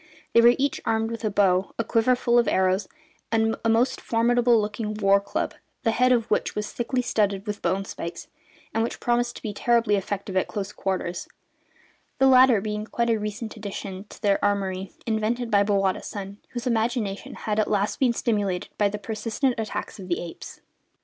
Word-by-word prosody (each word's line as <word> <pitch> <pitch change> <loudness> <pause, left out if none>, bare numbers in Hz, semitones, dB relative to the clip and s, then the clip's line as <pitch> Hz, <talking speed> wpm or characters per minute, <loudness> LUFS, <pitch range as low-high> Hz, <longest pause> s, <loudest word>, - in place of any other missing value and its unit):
They 235 - +7
were 240 +1 +7
each 280 +1 0
armed 225 0 0
with 230 0 -6
a 215 - +1
bow, 190 -2 +2
a 230 - 0
quiver 230 +3 +3
full 240 -1 +3
of 235 - +2
arrows, 190 +1 +2 0.4
and 225 0 +2
a 230 - +2
most 240 +4 +2
formidable 240 0 +3
looking 210 0 -3
war 200 -1 +4
club, 200 - -2 0.3
the 225 - +3
head 250 +2 +3
of 235 -3 +3
which - - 0
was 210 0 -3
thickly 250 +1 -1
studded 200 -3 0
with 210 -1 -4
bone 190 +3 0
spikes, 170 -3 -6 0.5
and 225 - +1
which 230 - -2
promised 240 0 0
to - - -10
be 215 -3 -3
terribly 230 -1 +2
effective 195 0 -3
at 185 - +2
close 205 -1 -4
quarters 185 -2 -3 0.9
the 270 - +4
latter 255 -4 +6
being 210 0 -3
a - - -6
quite 235 0 0
recent 215 0 -2
addition 200 -2 -6
to - - -14
their 200 -1 +2
armoury 195 -2 -1
invented 230 +2 -1
by 200 -1 +5
Bowata's 195 -2 +1
son, 200 0 -7
whose 240 -1 -5
imagination 225 -4 -1
had 215 0 -2
at 215 - +1
last 205 0 0
been 260 -3 +4
stimulated 205 -6 -1
by 205 -1 +4
the 210 - -4
persistent 225 +5 -1
attacks 220 0 -4
of 185 - -8
the 175 - 0
apes. 170 - -9
215 Hz, 190 wpm, -25 LUFS, 200-235 Hz, 0.9 s, They